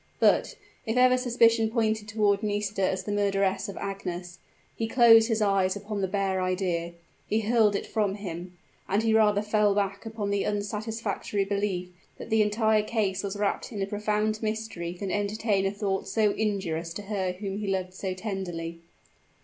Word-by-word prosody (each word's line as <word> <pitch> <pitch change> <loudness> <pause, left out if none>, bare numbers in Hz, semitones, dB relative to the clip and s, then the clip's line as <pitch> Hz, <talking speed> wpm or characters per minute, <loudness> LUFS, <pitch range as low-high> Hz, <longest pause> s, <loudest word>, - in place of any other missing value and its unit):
But, - - +3 0.3
if 225 +1 -2
ever 255 0 +6
suspicion 230 -3 +3
pointed 220 -2 0
toward 210 -2 +2
Nisida 205 -2 0
as 190 0 -2
the 205 - -4
murderess 200 -1 +1
of 200 - -7
Agnes, 180 -2 -5 0.4
he 225 - -2
closed 225 -2 +7
his 225 -2 +1
eyes 195 -2 +2
upon 205 0 -4
the 190 - +1
bare 190 -1 0
idea 180 -2 -1 0.3
he 220 +1 +1
hurled 215 -2 +3
it - - -2
from 205 -3 0
him; 180 -3 -7 0.3
and 205 +3 +2
he 225 -1 +2
rather 210 -2 +4
fell 210 -1 +2
back 200 -1 -1
upon 215 -2 -3
the 200 -1 +1
unsatisfactory 210 -1 -2
belief 195 -3 -2 0.3
that - - -9
the 220 0 +4
entire 215 +1 +3
case 210 -4 -1
was 200 0 -4
wrapped 205 +3 -1
in 210 - -5
a 195 - 0
profound 210 +1 -1
mystery 215 -6 -3
than 190 +1 -5
entertain 205 -1 0
a - - -1
thought 200 -2 -2
so 215 -2 +2
injurious 175 -6 -2
to 205 - -5
her 195 -3 -2
whom 195 +1 -5
he 210 - -4
loved 185 -1 -2
so 185 0 -4
tenderly. 175 -5 -5
205 Hz, 175 wpm, -27 LUFS, 190-215 Hz, 0.4 s, closed